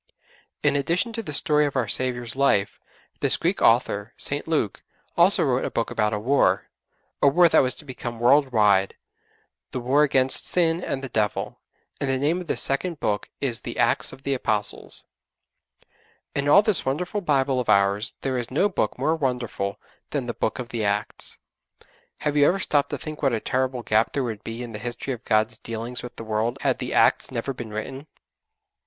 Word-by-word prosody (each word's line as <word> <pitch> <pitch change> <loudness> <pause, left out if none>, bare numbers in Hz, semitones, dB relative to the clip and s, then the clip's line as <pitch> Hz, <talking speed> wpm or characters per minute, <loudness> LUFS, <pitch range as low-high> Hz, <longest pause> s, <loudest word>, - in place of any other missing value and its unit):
In - - +3
addition 175 - 0
to 225 - -3
the 190 - -7
story 150 +1 +2
of 140 - -6
our 125 -4 0
Saviour's 120 0 -1
life 130 -8 +1 0.4
this - - +2
Greek - - -1
author, 105 +2 +2
St. 145 +2 -2
Luke, 150 -11 -1 0.3
also - - +5
wrote - - +1
a - - -1
book - - -2
about 105 0 +1
a 105 - -1
war 130 +7 +1 0.5
a - - +5
war 175 +5 +6
that - - +4
was 130 -1 +1
to 150 - -8
become 120 -3 -6
world 135 +3 +4
wide 100 -4 +3 0.7
the 130 - -4
war 130 +4 +2
against 135 -3 +3
sin 170 0 +2
and 135 - -3
the - - -3
Devil, 105 -3 -2 0.4
and 140 - -2
the 135 - +1
name 155 +7 0
of 175 - -10
this - - +3
second 155 +4 -1
book 105 -1 -2
is 125 -5 0
the - - -7
'Acts - - +1
of 135 0 -13
the 140 - 0
Apostles.' 110 -5 -2 1.3
In 140 0 0
all 200 +8 +7
this 215 -5 +4
wonderful 180 +10 -2
Bible 135 -5 +1
of 125 - -3
ours 100 +3 +2
there 130 -2 -1
is 120 - -4
no 155 +10 +2
Book 190 - -1
more 160 - +1
wonderful 125 -8 -2 0.3
than 140 -4 -2
the 120 - -3
'Book 110 - -2
of 125 -2 -6
the 115 -2 -3
Acts.' 105 +1 -2 0.8
Have 150 -1 -1
you 145 0 +5
ever 190 - +2
stopped 145 -5 +1
to - - -3
think 155 -1 -8
what 135 -4 +2
a 115 - 0
terrible 130 +1 -1
gap 110 +1 +1
there 140 - 0
would 110 -4 -5
be 115 +2 -6
in 120 - -7
the 105 - -7
history 120 +4 -4
of 120 -1 -9
God's 110 +1 +1
dealings 115 +2 -6
with 125 0 -9
the - - -7
world 110 +3 -1
had - - +1
the - - -4
'Acts' - - +3
never 120 +4 -3
been 120 -3 -7
written? 130 +7 -6
130 Hz, 200 wpm, -24 LUFS, 115-145 Hz, 1.3 s, all